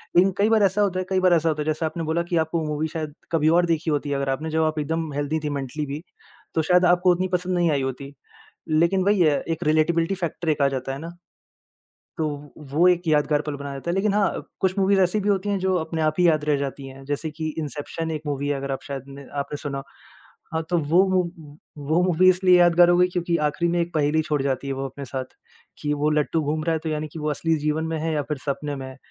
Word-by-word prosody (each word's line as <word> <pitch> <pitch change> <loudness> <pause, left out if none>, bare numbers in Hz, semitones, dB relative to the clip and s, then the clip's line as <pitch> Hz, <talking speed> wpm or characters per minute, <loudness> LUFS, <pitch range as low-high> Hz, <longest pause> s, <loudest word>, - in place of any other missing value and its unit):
लेकिन 185 +3 +5
कई 205 +2 +3
बार 220 -2 +4
ऐसा 195 +1 +2
होता 190 -3 +1
है, 185 - -2
कई 190 -1 +2
बार 185 -1 +4
ऐसा 165 -1 +3
होता 155 -1 -1
है, - - -3
जैसे 155 +1 -1
आपने 160 +1 -3
बोला 160 +2 0
कि 170 - +2
आपको 160 +1 -2
मूवी 150 +1 -1
शायद 155 -2 -4 0.2
कभी 155 -2 +3
और 175 - +3
देखी 165 -1 0
होती 145 0 -1
है, 140 - 0
अगर 140 0 -2
आपने 150 +4 -2
जब 160 0 +2
आप 155 0 0
एकदम 160 +1 -2
हेल्थी 145 +2 -1
थी 150 - -1
मेंटली 140 +3 -4
भी। 145 +2 -5 0.5
तो 160 - +3
शायद 180 +3 +4
आपको 180 +1 +4
उतनी 180 +1 +1
पसंद 180 0 0
नहीं 170 -2 +3
आई 140 -2 +1
होती, 135 +1 -5 0.6
लेकिन 170 +4 +2
वही 205 -1 +3
है 150 -4 +3
एक 160 - -2
रिलेटेबिलिटी 165 +3 +2
फैक्टर 170 -2 -4
एक 150 -2 +1
आ 140 - +5
जाता 135 -1 -3
है 135 - -5
ना। 165 +3 -8 1.0
तो 160 -2 0 0.4
वो 170 +5 +4
एक 180 -1 +4
यादगार 150 -1 +2
पल 150 -1 -4
बना 140 0 -6
देता 140 +5 -6
है। - - -1
लेकिन 195 +1 +1
हाँ 205 -1 +3
अ, - - -3 0.2
कुछ 190 +1 +1
मूवीज़ 195 0 +3
ऐसी 185 +3 +2
भी 205 - 0
होती 200 0 +1
हैं 200 - +1
जो 190 0 +1
अपने 160 -1 -3
आप 155 -1 +1
ही 180 - +5
याद 155 -2 +2
रह 150 -1 +3
जाती 140 0 -4
हैं। 135 0 -11
जैसे 145 +3 -2
कि 160 +1 -6
इन्सेप्शन 155 +2 -4
एक 155 -2 -3
मूवी 145 0 -2
है 145 - +1
अगर 135 0 -4
आप 135 - -3
शायद 135 -2 -6
न 140 -1 -11
आपने 145 +1 -4
सुना 140 -2 -4 0.7
हाँ 160 - 0
तो 175 - +2
वो 165 +5 +4
मू 185 -1 +3 0.7
वो 160 +3 +3
मूवी 180 0 +4
इसलिए 185 0 +5
यादगार 175 0 +6
हो 175 - +4
गयी 180 0 +5
क्योंकि 175 -1 -1
आख़िरी 170 +3 0
में 175 - +1
एक 170 +1 -4
पहेली 155 +1 +2
छोड़ 150 -3 -1
जाती 135 0 -1
है 135 - -1
वो 135 0 -4
अपने 140 +2 -8
साथ, 130 +1 -4 0.6
कि 150 -1 0
वो 150 +1 +1
लट्टू 150 +2 +1
घूम 155 +1 -1
रहा 165 - +2
है, 160 - 0
तो 160 +1 -4
यानी 155 0 -2
कि 160 - -6
वो 150 0 -1
असली 165 +3 0
जीवन 150 +2 -1
में 160 - -2
है 160 +1 -1
या 150 - +1
फिर 150 - -1
सपने 145 +1 -2
में 135 -1 -6
है। 130 - -11
160 Hz, 265 wpm, -24 LUFS, 145-175 Hz, 1.0 s, यादगार